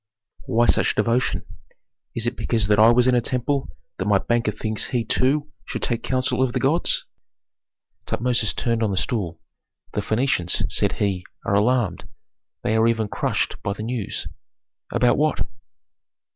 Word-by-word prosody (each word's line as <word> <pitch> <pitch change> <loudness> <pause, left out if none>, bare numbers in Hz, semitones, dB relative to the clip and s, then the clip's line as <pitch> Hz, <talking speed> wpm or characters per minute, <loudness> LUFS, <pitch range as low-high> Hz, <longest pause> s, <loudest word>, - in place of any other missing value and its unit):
"Why 120 -2 +3
such - - +3
devotion? 120 +2 +1 0.7
Is 115 - 0
it 120 +1 -1
because 115 -5 0
that 105 +2 +3
I 110 +1 +8
was 120 +1 +4
in 130 - +4
a 120 - +4
temple 130 - -2 0.2
that 95 - -1
my 105 -1 +5
banker 120 +2 0
thinks 110 0 -3
he 120 -3 -1
too 145 +3 +1
should - - -5
take 120 -1 0
counsel 130 +1 0
of 130 -2 +1
the - - 0
gods?" 155 +6 +2 1.0
Tutmosis 115 -5 0
turned 115 -1 0
on 110 - +2
the 95 - -2
stool. 90 -5 -2 0.5
"The 105 - 0
Phœnicians," 110 -5 +1
said - - +1
he, 95 -3 -1 0.2
"are - - 0
alarmed; 105 -2 +1 0.6
they 110 - +1
are 110 +1 +4
even 115 -2 +1
crushed - - -1
by 100 - -2
the 105 - -7
news 115 -2 -3 0.3
" - - -29
"About 125 +2 +3
what?" 155 0 +1
115 Hz, 165 wpm, -23 LUFS, 105-125 Hz, 1.0 s, I